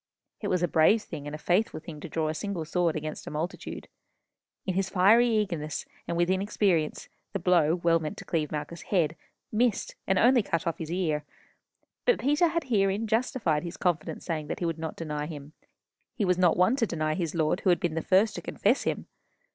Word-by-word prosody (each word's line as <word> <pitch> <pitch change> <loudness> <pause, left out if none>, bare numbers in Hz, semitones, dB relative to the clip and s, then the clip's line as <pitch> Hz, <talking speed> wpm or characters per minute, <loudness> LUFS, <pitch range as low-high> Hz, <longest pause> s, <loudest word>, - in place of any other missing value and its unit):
It 205 - -3
was 180 -2 +1
a - - +3
brave 170 +8 +4
thing 145 0 -7
and 145 - -5
a - - -5
faithful 180 +7 +1
to 165 0 -9
draw 160 0 -1
a 155 - -1
single 180 -1 -3
sword 170 0 +1
against 155 0 -5
a - - -3
multitude. 160 +5 -5 0.8
In 185 - -1
his 190 +1 0
fiery 210 +6 +5
eagerness 175 -9 -1 0.2
and 170 - -1
inexperience, 185 -2 +1 0.3
the - - 0
blow, 170 -3 +3
well 170 -1 +2
meant 155 -1 -5
to - - -9
cleave 155 -3 -1
Malchus's 155 +3 -5
head, 165 -5 +1 0.4
missed, 225 -1 +1
and 190 - +2
only 245 +3 +5
cut 165 -5 -2
off 165 - -2
his 160 -1 -5
ear; 160 -5 0 0.8
but - - +4
Peter 295 +6 +3
had 335 0 -1
herein 205 -4 +1
justified 220 -8 +1
his 170 -1 -7
confident 175 -4 -1
saying 155 -4 -3
that - - -3
he 175 - -2
would 165 -1 -2
not 160 -1 -4
deny 150 -2 -4
him. 150 -2 -9 0.6
He 215 - 0
was 180 -1 +2
not 175 -3 +4
one 185 +8 +4
to 230 - +1
deny 155 -3 -1
his 165 -1 -2
Lord 155 -2 +1
who - - +1
had 175 - +4
been 170 -3 -1
the 165 - -1
first 195 +6 +3
to - - -5
confess - - +1
him! - - -1
175 Hz, 205 wpm, -28 LUFS, 155-200 Hz, 0.8 s, fiery